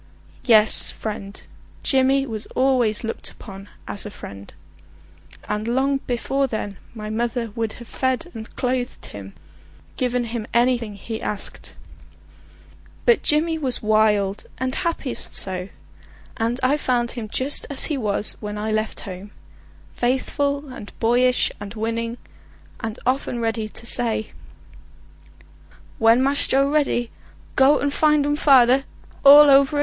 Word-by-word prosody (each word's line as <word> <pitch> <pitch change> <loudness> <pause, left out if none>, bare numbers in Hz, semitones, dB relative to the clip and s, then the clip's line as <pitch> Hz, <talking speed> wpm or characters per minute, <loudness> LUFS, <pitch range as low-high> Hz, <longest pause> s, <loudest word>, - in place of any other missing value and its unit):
Yes, 220 -3 +5
friend; 205 -2 -6 0.4
Jimmy 270 0 +3
was 220 -4 -6
always 250 -5 +2
looked 225 - -5
upon 195 -1 -12 0.2
as 200 - -4
a 210 - -5
friend; 100 - -11 1.0
and 210 +1 -3
long 265 +3 +1
before 270 +3 0
then 205 -5 -5 0.2
my 215 -1 -6
mother 230 0 -2
would 225 0 -3
have 235 - -12
fed 260 +6 -2
and 220 0 -8
clothed 250 -1 -2
him, 100 -1 -10 0.6
given 250 -1 0
him 230 -1 -5
anything 235 -3 +1
he 220 +3 -6
asked. 205 -2 -5 1.3
But 475 - +4
Jimmy 320 +2 +1
was 260 -6 -2
wild 210 -2 +2
and 260 0 -2
happiest 330 -7 -1
so, 185 0 +3 0.7
and 230 +3 -1
I 275 +3 +3
found 245 -4 0
him 225 -3 -6
just 265 +6 0
as 280 - -2
he 305 - -2
was 210 -5 0
when 210 0 -6
I 215 +1 -3
left 215 0 -2
home, 190 +1 -8 0.7
faithful 280 +3 -1
and 205 - -10
boyish 245 +2 +2
and 205 +2 -8
winning, 230 +2 -3 0.6
and 220 0 -5
often 255 -1 -1
ready 225 -1 -2
to 235 - -10
say: 230 -2 +2 1.7
"When 230 +3 +5
Mass 280 +1 +2
Joe 275 +1 +2
ready, 280 -6 0 0.4
go 270 +2 +5
and 285 0 -1
find 300 -1 +3
um 290 0 +1
fader 270 -2 +5 0.4
all 290 +1 +10
over 275 +1 +5
again!" - - +1
240 Hz, 135 wpm, -22 LUFS, 215-270 Hz, 1.7 s, all